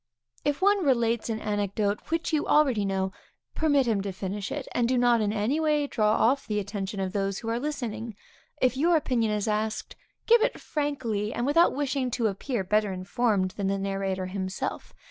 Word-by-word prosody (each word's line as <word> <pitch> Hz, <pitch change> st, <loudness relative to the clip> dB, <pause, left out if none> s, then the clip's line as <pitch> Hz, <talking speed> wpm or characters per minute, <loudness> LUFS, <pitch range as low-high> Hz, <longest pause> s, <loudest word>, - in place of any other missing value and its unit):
If 290 Hz, +5 st, -1 dB
one 405 Hz, -1 st, +4 dB
relates 235 Hz, -5 st, +1 dB
an 220 Hz, -1 st, -2 dB
anecdote 205 Hz, -1 st, -1 dB
which 330 Hz, 0 st, -1 dB
you 305 Hz, -, +1 dB
already 265 Hz, -9 st, +3 dB
know, 190 Hz, -1 st, -1 dB, 0.4 s
permit 285 Hz, -4 st, +2 dB
him 220 Hz, -4 st, +1 dB
to 200 Hz, 0 st, -3 dB
finish 195 Hz, +2 st, -4 dB
it, 285 Hz, -3 st, -4 dB
and 240 Hz, -1 st, +1 dB
do 255 Hz, +1 st, +1 dB
not 240 Hz, -2 st, +4 dB
in 205 Hz, -1 st, +1 dB
any 220 Hz, +8 st, 0 dB
way 300 Hz, -2 st, +2 dB
draw 215 Hz, -6 st, +1 dB
off 260 Hz, +5 st, +2 dB
the 210 Hz, -2 st, -1 dB
attention 200 Hz, 0 st, -3 dB
of 190 Hz, -1 st, -2 dB
those 195 Hz, -1 st, -1 dB
who 225 Hz, -, -5 dB
are 230 Hz, +1 st, 0 dB
listening. 235 Hz, -6 st, -4 dB, 0.4 s
If 255 Hz, 0 st, +2 dB
your 335 Hz, +6 st, +3 dB
opinion 235 Hz, -7 st, 0 dB
is 210 Hz, 0 st, -1 dB
asked, 215 Hz, 0 st, -2 dB, 0.3 s
give 470 Hz, 0 st, +6 dB
it -, -, 0 dB
frankly, 240 Hz, -9 st, -2 dB
and 240 Hz, -, -2 dB
without 330 Hz, +3 st, +4 dB
wishing 275 Hz, -2 st, -1 dB
to 235 Hz, -, 0 dB
appear 215 Hz, +2 st, -1 dB
better 210 Hz, +1 st, +1 dB
informed 190 Hz, +1 st, 0 dB
than 195 Hz, +1 st, -3 dB
the 195 Hz, 0 st, 0 dB
narrator 195 Hz, -1 st, -2 dB
himself. 185 Hz, 0 st, -4 dB
220 Hz, 190 wpm, -27 LUFS, 200-270 Hz, 0.4 s, give